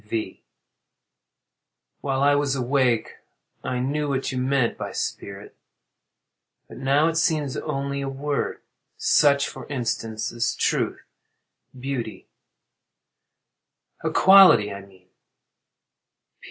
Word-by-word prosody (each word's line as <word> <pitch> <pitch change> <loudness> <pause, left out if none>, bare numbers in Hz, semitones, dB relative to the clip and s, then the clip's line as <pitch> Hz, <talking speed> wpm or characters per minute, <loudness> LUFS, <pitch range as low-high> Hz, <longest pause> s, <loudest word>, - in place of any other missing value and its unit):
V. 110 +1 -5 1.6
While 135 -1 -1
I 145 0 +5
was 145 -1 +1
awake 125 -3 0 0.5
I 125 - -2
knew 145 +4 -1
what 135 -1 -2
you 130 - -3
meant 130 -2 +1
by - - -6
"spirit," 100 +1 -6 1.1
but - - -12
now 140 +4 +2
it 165 0 -1
seems 155 -5 0
only 140 -2 -3
a 135 - -3
word—such, 140 0 0
for - - -9
instance, 115 -3 -3
as 115 -1 -1
truth, - - -1 0.8
beauty—a 125 -6 -5 1.8
quality, 185 - +6
I 100 - -8
mean. 95 -2 -21
135 Hz, 100 wpm, -24 LUFS, 115-145 Hz, 1.8 s, quality